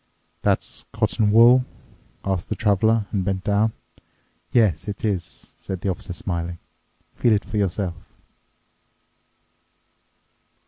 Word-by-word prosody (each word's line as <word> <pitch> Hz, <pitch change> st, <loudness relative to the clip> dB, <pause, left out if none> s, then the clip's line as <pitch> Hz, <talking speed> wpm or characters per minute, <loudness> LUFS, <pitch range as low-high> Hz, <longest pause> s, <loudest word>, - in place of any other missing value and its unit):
"That's -, -, 0 dB
cotton 105 Hz, -2 st, +1 dB
wool?" 120 Hz, +3 st, +7 dB, 0.6 s
asked 95 Hz, -3 st, -1 dB
the -, -, -1 dB
Traveler 110 Hz, +1 st, +2 dB
and 100 Hz, -3 st, 0 dB
bent 95 Hz, 0 st, -2 dB
down. 105 Hz, +2 st, +2 dB, 0.8 s
"Yes, 105 Hz, -9 st, +3 dB
it 105 Hz, +1 st, -4 dB
is," 90 Hz, -7 st, -3 dB
said 95 Hz, -2 st, -6 dB
the 100 Hz, -, -1 dB
Officer 90 Hz, 0 st, -4 dB
smiling, 85 Hz, -1 st, -3 dB, 0.6 s
"feel 120 Hz, -, +3 dB
it 105 Hz, -, +1 dB
for 110 Hz, -, -4 dB
yourself." 95 Hz, -2 st, 0 dB
100 Hz, 110 wpm, -23 LUFS, 90-110 Hz, 0.8 s, wool